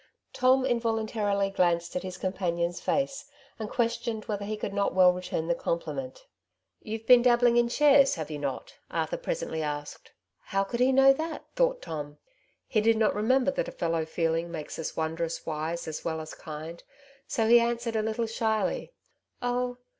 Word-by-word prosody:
Tom 255 Hz, +1 st, +3 dB
involuntarily 220 Hz, -4 st, 0 dB
glanced 175 Hz, -2 st, +1 dB
at 180 Hz, -, -1 dB
his 185 Hz, 0 st, -6 dB
com 185 Hz, 0 st, -2 dB
panion's 175 Hz, -2 st, -1 dB
face, 275 Hz, 0 st, -1 dB, 0.3 s
and 215 Hz, -1 st, -4 dB
questioned 230 Hz, -2 st, -1 dB
whether 205 Hz, -1 st, -3 dB
he 215 Hz, +1 st, -3 dB
could 205 Hz, -1 st, -4 dB
not 200 Hz, -2 st, 0 dB
well 180 Hz, -1 st, +6 dB
return 180 Hz, -3 st, -3 dB
the 170 Hz, -, +2 dB
compliment. 150 Hz, -6 st, -3 dB
^' -, -, -17 dB, 0.6 s
You've 220 Hz, +1 st, -6 dB
been 250 Hz, 0 st, +8 dB
dabbling 240 Hz, -1 st, +4 dB
in 240 Hz, 0 st, +4 dB
shares, 280 Hz, +1 st, +5 dB
have 160 Hz, -2 st, -5 dB
you 150 Hz, -, -4 dB
not? 140 Hz, -2 st, -5 dB
" -, -, -44 dB
Arthur -, -, -2 dB
presently -, -, -3 dB
ksked. 145 Hz, -1 st, -5 dB, 0.2 s
" -, -, -55 dB
How 195 Hz, 0 st, +2 dB
could 235 Hz, +5 st, -4 dB
he 255 Hz, +1 st, +4 dB
know 270 Hz, +1 st, +7 dB
that? 315 Hz, +3 st, -5 dB
" -, -, -41 dB
thought -, -, +1 dB
Tom. 145 Hz, -2 st, -6 dB, 0.5 s
He 215 Hz, -, +1 dB
did 225 Hz, +1 st, +3 dB
not 220 Hz, -1 st, +3 dB
remember 255 Hz, +6 st, +2 dB
that -, -, -2 dB
a -, -, -5 dB
fellow 165 Hz, -1 st, -1 dB
feeling 165 Hz, +1 st, -1 dB
makes 160 Hz, -2 st, -6 dB
us 160 Hz, -, -5 dB
wondrous 160 Hz, +1 st, -2 dB
wise 160 Hz, +2 st, -3 dB
as 155 Hz, -, -5 dB
well 160 Hz, -1 st, -2 dB
as 155 Hz, 0 st, -7 dB
kind, 160 Hz, +2 st, -8 dB, 0.5 s
so 225 Hz, -4 st, 0 dB
he 240 Hz, +1 st, +8 dB
answered 235 Hz, 0 st, -1 dB
a 220 Hz, -, +2 dB
little 220 Hz, +2 st, -1 dB
shyly,— 225 Hz, -, -1 dB, 0.3 s
'' -, -, -46 dB
Oh 245 Hz, 0 st, -1 dB
210 Hz, 190 wpm, -28 LUFS, 170-240 Hz, 0.6 s, been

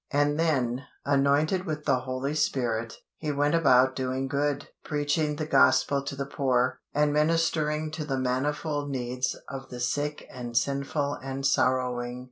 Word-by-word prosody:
And 145 Hz, +2 st, +1 dB
then, 130 Hz, -6 st, +1 dB, 0.2 s
anointed 145 Hz, +6 st, +2 dB
with 150 Hz, -1 st, -4 dB
the 135 Hz, -3 st, +3 dB
Holy 130 Hz, +3 st, -3 dB
Spirit, 120 Hz, -6 st, -1 dB, 0.2 s
He 155 Hz, -2 st, -2 dB
went 145 Hz, +1 st, +1 dB
about 130 Hz, -5 st, +4 dB
doing 130 Hz, +1 st, -2 dB
good, 145 Hz, +1 st, -1 dB, 0.2 s
preaching 150 Hz, 0 st, 0 dB
the 155 Hz, +1 st, -3 dB
Gospel 140 Hz, -2 st, +4 dB
to 140 Hz, 0 st, -5 dB
the 140 Hz, 0 st, -3 dB
poor, 130 Hz, -3 st, 0 dB
and 150 Hz, 0 st, +2 dB
ministering 155 Hz, 0 st, +1 dB
to 155 Hz, 0 st, -4 dB
the 135 Hz, -3 st, -2 dB
manifold 145 Hz, +3 st, -1 dB
needs 125 Hz, -1 st, -2 dB
of 135 Hz, -1 st, -7 dB
the 125 Hz, -, -7 dB
sick 145 Hz, +4 st, -2 dB
and 120 Hz, -2 st, -5 dB
sinful 140 Hz, +2 st, 0 dB
and 135 Hz, +1 st, -4 dB
sorrowing. 125 Hz, -2 st, +1 dB
140 Hz, 150 wpm, -27 LUFS, 130-150 Hz, 0.2 s, about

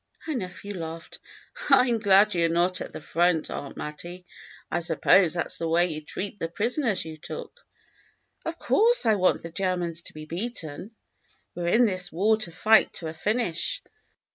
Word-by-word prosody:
Her 315 Hz, -, -2 dB
nephew 200 Hz, -3 st, -5 dB
laughed. 165 Hz, 0 st, -7 dB, 0.3 s
" -, -, -11 dB
I 250 Hz, -, +6 dB
am 235 Hz, -2 st, +1 dB
glad 205 Hz, 0 st, +5 dB
you're 170 Hz, -1 st, +2 dB
not 175 Hz, +2 st, +1 dB
at -, -, -6 dB
the -, -, -8 dB
front. 170 Hz, 0 st, +1 dB
Aunt 140 Hz, -, -6 dB
Mattie. 175 Hz, +4 st, -7 dB, 0.5 s
I 175 Hz, -, +1 dB
suppose 170 Hz, +1 st, +3 dB
that 170 Hz, -, -2 dB
's -, -, -6 dB
the 165 Hz, -, -1 dB
way 170 Hz, +1 st, +3 dB
you 155 Hz, 0 st, -5 dB
'd 150 Hz, -, -28 dB
treat 200 Hz, +1 st, -4 dB
the 165 Hz, -, -1 dB
prisoners 225 Hz, -, 0 dB
you 160 Hz, -1 st, -8 dB
took." -, -, -8 dB, 0.4 s
" -, -, -41 dB
Of 330 Hz, 0 st, -3 dB
course 460 Hz, -, +3 dB
I 220 Hz, -, +5 dB
want 185 Hz, -3 st, +2 dB
the 165 Hz, -, -7 dB
Germans 175 Hz, -2 st, -2 dB
to -, -, -11 dB
be 155 Hz, 0 st, -8 dB
beaten. 180 Hz, +1 st, -5 dB, 0.6 s
We 175 Hz, -, -6 dB
're 170 Hz, -, -1 dB
in 235 Hz, +7 st, +5 dB
this 185 Hz, -4 st, -1 dB
war 205 Hz, +7 st, +3 dB
to 215 Hz, -6 st, -2 dB
fight 220 Hz, +6 st, +4 dB
to 160 Hz, -, -4 dB
a -, -, -6 dB
finish. 215 Hz, -, -1 dB
180 Hz, 195 wpm, -26 LUFS, 165-220 Hz, 0.6 s, I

